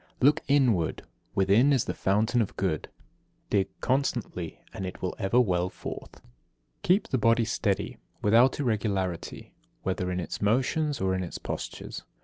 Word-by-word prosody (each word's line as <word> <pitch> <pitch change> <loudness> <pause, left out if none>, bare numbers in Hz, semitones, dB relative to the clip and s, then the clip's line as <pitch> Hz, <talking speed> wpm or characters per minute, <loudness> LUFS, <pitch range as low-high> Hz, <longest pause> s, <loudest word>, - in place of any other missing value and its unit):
59. - - +2
Look 150 +2 +3
inward. 125 - +2 0.3
Within 100 +9 +4
is 135 -5 +3
the - - -2
fountain 110 +5 +2
of 105 - -3
Good. 90 -6 -1 0.6
Dig 100 -2 +3
constantly 120 - -1
and 95 - -5
it 90 - -7
will 90 - -2
ever 105 +4 +3
well 90 -6 +2
forth. - - -8
60. - - -20 0.5
Keep 190 +4 +3
the 130 - +1
body 115 +1 +4
steady, 105 -3 -1 0.2
without 115 +7 +4
irregularity, 100 - -2 0.3
whether 90 -1 -1
in 90 0 -1
its 90 - -5
motions 135 +7 +1
or 95 0 +1
in 95 - -1
its 90 - -5
postures. - - -6
105 Hz, 155 wpm, -28 LUFS, 95-125 Hz, 0.6 s, Within